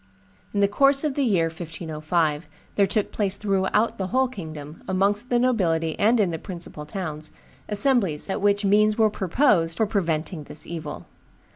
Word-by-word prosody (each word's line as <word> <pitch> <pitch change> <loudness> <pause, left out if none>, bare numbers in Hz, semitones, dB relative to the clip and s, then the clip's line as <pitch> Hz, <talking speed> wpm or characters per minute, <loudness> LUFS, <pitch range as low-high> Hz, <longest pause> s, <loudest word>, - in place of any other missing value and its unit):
In 200 - 0
the 200 - +5
course 275 +7 +3
of 300 -3 0
the 285 - -1
year 190 -9 +2
1505 160 -1 -2 0.2
there 200 -1 +3
took 205 +1 0
place 200 -2 -1
throughout 205 +3 0
the 190 - -1
whole 260 +6 +2
kingdom, 155 - -9
amongst 200 +5 +1
the 245 - +3
nobility 170 -10 +1
and 225 +3 +4
in 195 -5 +2
the 165 - -4
principal 170 -5 -8
towns, 155 -4 -5 0.4
assemblies 205 - +2
at 195 +1 -2
which 205 0 +2
means 210 +2 +3
were 220 -2 +4
proposed 185 - +2
for 220 - +2
preventing 165 -5 -2
this 150 - -8
evil. 160 -3 -6
195 Hz, 165 wpm, -24 LUFS, 165-215 Hz, 0.4 s, the